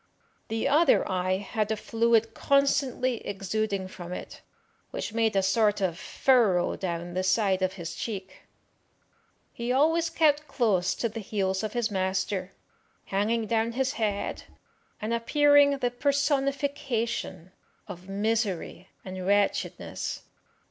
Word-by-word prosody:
The 225 +3 -1
other 305 +5 +4
eye 185 0 0
had 210 +2 -2
a 220 - 0
fluid 225 0 +1
constantly 275 -3 +1
exuding 200 -1 -3
from 180 -2 -9
it, - - -7 0.5
which - - -5
made 225 -2 +1
a 195 - +3
sort 210 +2 +2
of 185 -4 0
furrow 205 -3 +2
down 175 -1 -4
the 185 - 0
side 190 0 +2
of 185 0 0
his 170 -3 -6
cheek. 190 -4 -6 1.1
He 235 +1 -3
always 325 +5 +3
kept 305 -2 +2
close 205 -9 +1
to 235 - -1
the 225 0 -6
heels 190 -2 -1
of 215 -1 -4
his 240 -3 -1
master, 190 0 -1 0.6
hanging 220 +3 +1
down 230 +1 0
his 260 +1 0
head, 210 -3 -2 0.5
and 215 +2 -2
appearing 285 +4 +4
the 245 -2 -1
personification 275 - -1 0.4
of 180 +2 -10
misery 200 -3 -1 0.2
and 185 -1 -6
wretchedness. 205 0 -1
220 Hz, 130 wpm, -27 LUFS, 190-255 Hz, 1.1 s, other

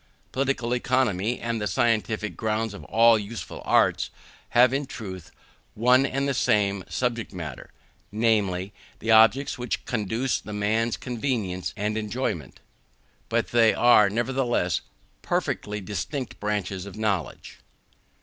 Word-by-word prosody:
Political 130 -3 0
Economy, 120 -3 0
and 115 -1 -2
the 105 - 0
scientific 110 -2 0
grounds 110 -1 -1
of 100 - -9
all 115 0 +5
the - - -3
useful 105 -2 -7
arts, - - +3 0.4
have 125 +1 +5
in 140 0 -1
truth 95 - -8 0.5
one 125 +4 +4
and 140 +1 -1
the 140 - +1
same 100 -5 +1
subject 120 -2 -2
matter; 80 -8 -7 0.4
namely, 100 -3 +1 0.2
the 110 - -1
objects 115 +5 +5
which 125 -1 -3
conduce 115 +3 -1
to 105 - -8
man's 110 +3 0
convenience 110 -8 -2
and 105 +2 -1
enjoyment: 105 - -4 0.7
but - - 0
they 115 -2 +4
are, 110 -4 +6
nevertheless, 120 -5 0 0.4
perfectly 105 0 -2
distinct 105 - -5
branches 100 -2 -2
of 100 - -10
knowledge. 100 -9 -3
110 Hz, 130 wpm, -25 LUFS, 100-120 Hz, 0.7 s, are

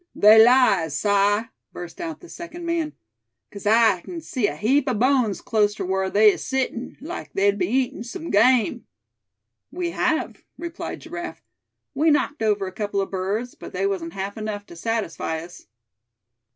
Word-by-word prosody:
"They 220 +2 +8
lies, 200 - +4
Si!" 205 +2 +3 0.3
burst 175 - -8
out 325 -3 -5
the 350 - -12
second 345 0 -8
man; 335 -2 -1 0.6
"'case 200 0 -7
I 220 -4 +4
kin 345 - -7
see 255 -8 -1
a - - -4
heap 265 +6 +2
o' 250 - 0
bones 245 -2 +2
clost 210 -1 +1
ter - - -3
whar 190 +1 0
they 210 +1 +6
is - - -6
settin', 260 -2 -3
like 335 +5 -7
they'd 200 +1 +2
be'n 180 0 0
eatin' 255 -2 0
some 280 +7 -7
game." 235 +1 +3 0.8
"We 350 -1 -3
have," - - -1 0.2
replied 340 0 -6
Giraffe; 345 +1 -7 0.5
"we 305 +4 +2
knocked 295 -2 +1
over 210 -3 +1
a 185 - -5
couple 205 +1 -2
of 195 - -2
birds, 200 +6 -2
but - - -11
they 190 +1 -1
wasn't 180 -4 -2
half 195 +2 -5
enough 210 -1 -4
to 170 - -13
satisfy 170 -5 -2
us." 170 +2 -11
220 Hz, 170 wpm, -23 LUFS, 195-270 Hz, 0.8 s, They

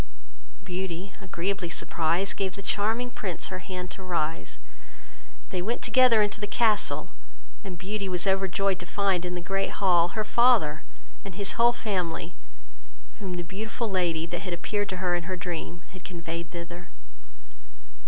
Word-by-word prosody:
Beauty, 185 0 -4
agreeably 190 0 -2
surprised, 170 +3 +1
gave 190 -2 -1
the 200 - -7
charming 225 +5 +1
Prince 185 -8 -2
her 185 - -4
hand 180 -1 -5
to - - -8
rise; 165 - -2 0.9
they 180 - -1
went 230 +6 -1
together 250 -4 +6
into 205 0 -2
the 205 - 0
castle, 215 0 +2 0.5
and 190 -4 -6
Beauty 195 +2 -3
was 180 -1 0
overjoyed 195 0 +2
to 180 - -6
find, 195 -1 +2
in 180 0 -2
the 175 - -3
great 195 +2 -1
hall, 175 -3 +4
her 215 - +2
father 215 -10 +4 0.4
and 195 -3 -7
his 200 0 +1
whole 235 0 +5
family, 180 -7 -2 0.9
whom 190 -4 -3
the 175 - -2
beautiful 220 +5 -3
lady, 170 -4 +1
that 175 +2 -4
appeared 205 +4 -1
to 185 - -2
her 180 -1 +1
in 175 -1 0
her 185 +1 -2
dream, 175 -1 -4
had 185 -1 -11
conveyed 170 -2 -5
thither. 170 0 -7
185 Hz, 155 wpm, -28 LUFS, 175-200 Hz, 0.9 s, together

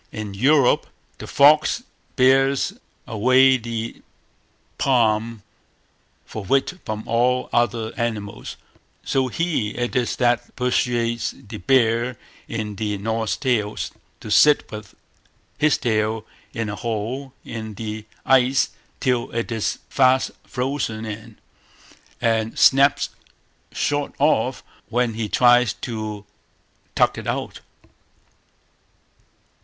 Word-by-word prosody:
In 105 -2 -6
Europe 135 +5 +3 0.3
the - - -8
fox 150 +11 +4 0.3
bears 135 +5 +3 0.3
away 130 +3 +4
the 115 -1 -5 0.8
palm 115 -4 +1 0.8
for 110 - -7
wit 135 - 0
from 110 0 -4
all 125 +2 +1
other 115 -1 0
animals, 110 -4 -4 0.5
so 130 -1 +1
he 130 -7 -1
it 120 +2 -2
is 125 -2 0
that 120 -1 0
persuades 120 -2 0
the 110 0 -9
bear 120 -1 +2 0.3
in 105 -3 -4
the 105 -1 -2
Norse 110 +2 -2
Tales 115 -6 -1 0.3
to 105 - -7
sit 150 +6 +5
with 105 -2 -9 0.6
his 155 0 +3
tail 110 -1 0 0.3
in 115 -1 -3
a 100 - -4
hole 120 +5 -4
in 110 -2 -6
the 110 0 -6 0.2
ice 130 +1 +4 0.3
till 125 -2 0
it 115 +1 -2
is 110 -2 -1
fast 130 -1 +3 0.2
frozen 125 -4 -2
in, 110 +1 -8 0.8
and 115 -1 0
snaps 140 +1 +5 0.6
short 145 -1 -1
off - - +1 0.3
when 120 -1 +1
he 110 -1 -3
tries 120 -2 +4
to 110 -3 -6 0.7
tug - - +2
it - - -8
out. - - -3
115 Hz, 110 wpm, -22 LUFS, 110-130 Hz, 0.8 s, sit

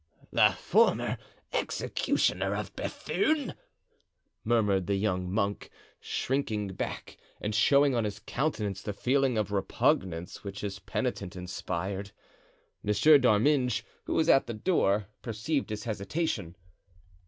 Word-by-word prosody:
"The - - +5
former - - +2 0.3
executioner - - 0
of - - -5
Bethune!" 310 -8 -1 0.9
murmured 105 -5 +2
the 100 - +1
young 90 -3 -1
monk, 100 0 -1 0.3
shrinking 110 -7 -1
back 95 - -5 0.2
and 105 +1 -3
showing 140 +6 +4
on 120 -2 +1
his 105 -1 -3
countenance 105 -9 -2
the 105 - -4
feeling 130 +3 +1
of 105 -1 -1
repugnance 90 -3 0
which 100 0 -6
his 100 -2 -4
penitent 90 - -3
inspired. 95 +2 -4 0.7
Monsieur 145 +9 +5
d'Arminges, 125 +1 +3 0.2
who - - -2
was 160 - +2
at 135 - +5
the 115 - -4
door, 105 - +2 0.2
perceived 120 +6 -2
his 105 -1 -4
hesitation. 105 - -2
105 Hz, 120 wpm, -29 LUFS, 100-130 Hz, 0.9 s, The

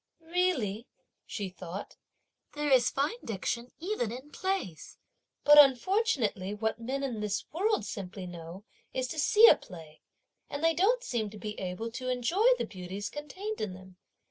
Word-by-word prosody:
"Really," 310 - 0 0.4
she 205 -3 -4
thought, 185 +1 -8 0.6
"there 295 -1 -1
is 250 -2 +5
fine 295 - -1
diction 235 +3 -3
even 345 - -2
in 260 +5 -8
plays! 375 - -3 0.5
but 295 0 +9
unfortunately 265 - +3
what 220 +1 -2
men 265 +4 -3
in 245 -5 -2
this 205 -1 -2
world 415 +5 +1
simply 190 -3 -6
know 175 +2 -9 0.3
is 255 -1 0
to 315 - -4
see 435 +9 +7
a - - +9
play, 160 -4 -13 0.5
and 285 +2 -5
they 330 0 +4
don't 460 +9 +2
seem 230 - -2
to 210 - -11
be 210 0 -5
able 190 +5 -4
to 255 +2 -4
enjoy 290 - +2
the - - -2
beauties 190 +2 -6
contained 375 +9 -6
in 190 -4 -3
them." 185 0 -14
240 Hz, 160 wpm, -30 LUFS, 200-325 Hz, 0.6 s, but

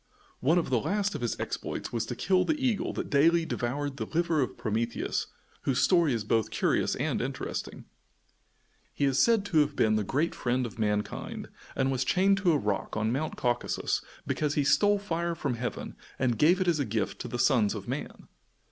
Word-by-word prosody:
One 160 +7 +3
of 165 -6 0
the 125 - +3
last 200 - 0
of - - -5
his 120 - -2
exploits - - -4
was 115 -2 -1
to 120 - -4
kill 185 +5 +2
the 310 -1 0
eagle 250 -6 0
that - - -4
daily 165 +4 +4
devoured 140 +1 -3
the - - -4
liver 165 -2 +1
of 125 - -2
Prometheus, 115 +2 -2 0.3
whose 135 -2 0
story 170 -5 +4
is 115 -3 -1
both 110 0 +1
curious - - +1
and - - -1
interesting. - - -5 1.1
He 140 - +1
is 135 -1 +2
said 225 +1 +4
to 175 -6 +2
have 145 -1 +2
been 110 -1 +3
the 105 - 0
great 145 - 0
friend 125 +1 0
of 115 -1 -8
mankind, 105 -1 -2 0.3
and 135 0 +1
was 130 -1 0
chained 195 +7 +3
to 190 -3 +3
a 155 - +3
rock 105 -4 -2
on 110 +1 +1
Mount 140 +5 -2
Caucasus 120 -1 -1 0.2
because 150 -1 -1
he 145 - +2
stole 175 +9 +4
fire 170 -4 -2
from 125 - -2
heaven 120 +1 -4 0.2
and 125 -3 0
gave 175 +5 +5
it 185 - 0
as 165 -3 +2
a - - +2
gift 105 -2 -2
to - - -5
the 120 - -4
sons 120 -5 +3
of - - -7
man. - - -5
140 Hz, 200 wpm, -29 LUFS, 120-170 Hz, 1.1 s, gave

